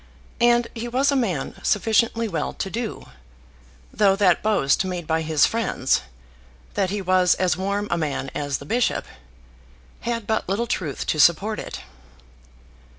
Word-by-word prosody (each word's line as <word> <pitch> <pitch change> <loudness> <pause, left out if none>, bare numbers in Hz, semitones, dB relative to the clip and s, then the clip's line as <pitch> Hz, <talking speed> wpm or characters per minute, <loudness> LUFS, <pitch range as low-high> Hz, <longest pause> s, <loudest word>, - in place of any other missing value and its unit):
And 240 0 +4
he 235 +1 -5
was 265 +4 +2
a - - +1
man 195 - -1
sufficiently 225 +2 +1
well 175 -6 -3
to 195 - -4
do, 230 -1 -4 0.9
though 200 -2 +4
that 195 -3 +3
boast 200 -9 +2
made 180 -3 -4
by 160 +1 0
his 155 -2 +3
friends, 220 - 0 0.7
that 195 -2 0
he 200 0 -3
was 185 0 +3
as 180 -4 +1
warm 200 +3 -2
a 170 - +1
man 145 -3 -3
as 145 -2 -2
the 140 - -11
bishop, 240 +9 0 0.9
had 230 -1 -3
but 220 -3 -1
little 205 +5 0
truth 160 - -3
to 155 - -1
support 190 +8 +4
it. - - -7
195 Hz, 150 wpm, -23 LUFS, 170-230 Hz, 0.9 s, And